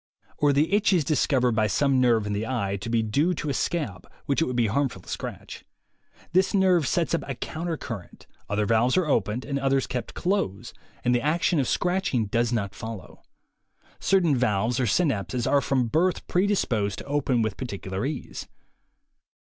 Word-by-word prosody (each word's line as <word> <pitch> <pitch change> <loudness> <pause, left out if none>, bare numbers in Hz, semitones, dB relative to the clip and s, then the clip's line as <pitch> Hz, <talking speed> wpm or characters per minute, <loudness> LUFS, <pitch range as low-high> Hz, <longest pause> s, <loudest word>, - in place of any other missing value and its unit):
Or, 145 -1 +4
the 150 +7 +2
itch 205 -1 +3
is 170 -4 +3
discovered 130 -3 +2
by 110 -1 +2
some 135 +4 +2
nerve 115 -4 +3
in 105 - -2
the 105 +2 -2
eye 100 -7 -1
to 100 +4 -6
be 115 -1 +2
due 145 +11 +1
to 150 -1 -3
a - - -1
scab, 125 - -3
which 140 +2 +1
it - - +3
would 125 - -3
be 120 -1 +2
harmful 135 +5 -1
to - - -21
scratch. - - -6 0.7
This 190 +3 +3
nerve 185 -6 +3
sets 165 -4 0
up - - +1
a 135 - -3
counter 165 +5 -4
current; 105 -11 -8 0.2
other 105 0 0
valves 115 - +2
are 185 - +3
opened 115 -4 0
and 140 -1 -2
others 135 -1 +1
kept 125 -1 -5
closed, 180 - -2 0.3
and 125 - +2
the 120 - +2
action 165 +3 +1
of 130 - +1
scratching 180 - 0
does 120 +3 0
not 100 -5 -1
follow. 110 -4 -8 0.8
Certain 175 -7 +3
valves, 120 0 +1
or 125 - +1
synapses, 125 - 0
are 140 - +3
from 130 -3 +1
birth 170 +10 +1
predisposed 130 - +1
to - - -8
open 140 -4 +1
with 110 -3 -2
particular 100 -5 -5
ease. 140 0 -5
130 Hz, 185 wpm, -26 LUFS, 110-155 Hz, 0.8 s, Or